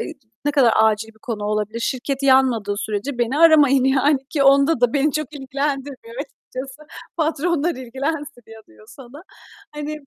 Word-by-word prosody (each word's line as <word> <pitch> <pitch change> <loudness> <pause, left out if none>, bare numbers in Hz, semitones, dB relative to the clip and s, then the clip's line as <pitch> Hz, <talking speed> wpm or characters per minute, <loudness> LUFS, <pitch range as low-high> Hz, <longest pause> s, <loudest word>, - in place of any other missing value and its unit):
eee, 400 - -5 0.3
ne 290 - +2
kadar 265 -6 +4
acil 220 0 +2
bir 220 0 -18
konu 225 -6 -4
olabilir? 210 +2 -2
Şirket 265 +3 -3
yanmadığı 260 -6 +3
sürece 215 +5 -4
beni 240 +4 0
aramayın 290 -5 +5
yani 270 +2 +3
ki 285 -3 0
onda 275 +1 +4
da 245 -2 +2
beni 290 +1 +1
çok 305 -1 -3
ilgilendirmiyor 275 -3 -4
açıkçası. 270 0 -10 0.3
Patronlar 330 +1 0
ilgilensin 275 +2 -5
ya 225 0 -13
diyor 105 -1 -20
sana. 270 +3 -13 0.5
Hani, 295 0 -5
270 Hz, 155 wpm, -21 LUFS, 235-290 Hz, 0.5 s, aramayın